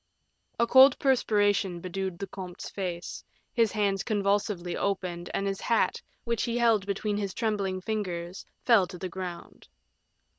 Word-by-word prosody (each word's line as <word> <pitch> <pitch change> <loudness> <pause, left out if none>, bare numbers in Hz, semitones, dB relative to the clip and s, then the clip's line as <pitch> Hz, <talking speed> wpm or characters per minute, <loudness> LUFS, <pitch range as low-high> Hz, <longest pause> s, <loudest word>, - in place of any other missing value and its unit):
A 235 - +5
cold 260 +2 +7
perspiration 205 -8 +2
bedewed 185 0 -4
the 195 - -4
comte's 185 -2 -8
face, 175 -3 -5 0.3
his 230 -3 +3
hands 200 -3 +1
convulsively 200 -4 0
opened, 180 -3 -2
and 195 - -1
his 195 -1 -2
hat, 230 - +1 0.2
which 235 -1 -1
he 235 -1 -1
held 225 -4 +3
between 205 +1 -1
his 200 -2 -3
trembling 200 -5 -1
fingers, 185 -4 -4 0.2
fell 220 -7 +5
to 180 - -9
the 185 +1 -5
ground. 180 -1 -8
195 Hz, 145 wpm, -28 LUFS, 185-215 Hz, 0.3 s, cold